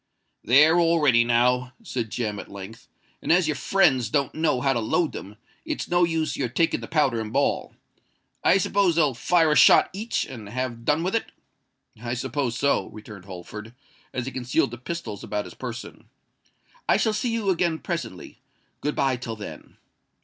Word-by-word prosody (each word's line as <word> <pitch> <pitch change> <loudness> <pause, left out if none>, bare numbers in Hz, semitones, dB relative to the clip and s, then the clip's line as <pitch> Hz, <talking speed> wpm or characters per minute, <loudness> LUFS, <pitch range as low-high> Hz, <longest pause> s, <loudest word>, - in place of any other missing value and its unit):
"They're 150 +7 +6
all 165 0 +3
ready 125 -6 +5
now," 125 +2 +2
said 120 -3 -3
Jem, 105 -3 -3
at - - -9
length; 100 +3 -10 0.3
"and - - -1
as 175 -1 +4
your 155 - +1
friends 135 - +2
don't 140 +1 0
know 160 -5 +1
how 135 +1 +2
to 120 - 0
load 155 +9 0
them, 100 +2 -8 0.3
it's - - -4
no 175 0 +3
use 160 -2 -1
your 130 -3 -2
taking 165 +7 +1
the - - -8
powder 135 -8 +1
and 110 -1 -6
ball. 140 +3 0 0.7
I - - +5
suppose 195 -2 +2
they'll 150 -5 +3
fire 165 +5 +2
a - - +3
shot - - +6
each, 215 +4 -2
and 110 -6 -9
have 120 0 -4
done 150 +4 +2
with 185 - -1
it?" 230 - -1 0.7
"I 120 +1 -3
suppose 125 0 -2
so," 140 -8 +1
returned 105 -3 -11
Holford, 105 +5 -9 0.4
as 125 -2 -3
he 135 - -4
concealed 125 -3 0
the 120 - -8
pistols 125 - -6
about 105 -1 -3
his - - -10
person. 120 -2 -8 0.8
"I - - +5
shall 220 - +1
see 215 +3 -1
you 220 -4 0
again 170 -2 +1
presently. 165 - -6 0.4
Good 150 - -1
bye 135 -2 +1
till 115 -2 -5
then." 105 -1 -10
130 Hz, 185 wpm, -25 LUFS, 115-165 Hz, 0.8 s, They're